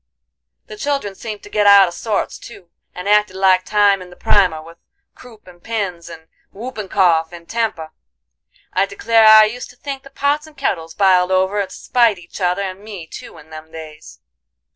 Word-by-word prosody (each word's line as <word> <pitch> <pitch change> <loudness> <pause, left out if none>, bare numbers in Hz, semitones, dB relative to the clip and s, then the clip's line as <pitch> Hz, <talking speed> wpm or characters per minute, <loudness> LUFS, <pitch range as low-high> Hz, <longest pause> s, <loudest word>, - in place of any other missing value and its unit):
The 215 - -11
children 275 -5 -2
seemed 210 +1 -8
to - - -12
git 210 -1 +2
out 200 -1 +8
of 175 - -6
sorts, 215 +2 -3
too, 185 -7 -14 0.2
and 180 +2 -7
acted 210 -2 +2
like 190 -1 +3
time 205 -2 +2
in 180 - -11
the 180 - -15
primer, 180 -6 +2
with 165 +2 -14 0.3
croup 230 -4 -16
and 175 -1 -17
pins, 190 -7 -4
and 160 -1 -12 0.2
whoopin' 215 -1 -7
cough 165 -4 +2
and 170 -1 -12
temper. 220 -9 -3 0.8
I - - +1
declare 230 - +3
I 215 0 +9
used 240 +3 -6
to 250 - -16
think 275 +1 -7
the 275 - -15
pots 285 +3 -1
and 305 -2 -18
kettles 165 -11 -3
biled 185 -2 +3
over 190 +2 +1
to 190 - -10
spite 235 -5 +1
each 180 +3 -12
other 180 +2 0
and 190 -1 -6
me 205 -5 -9
too 160 - -11
in 160 0 -17
them 155 0 -11
days. 155 - -11
195 Hz, 190 wpm, -18 LUFS, 175-220 Hz, 0.8 s, I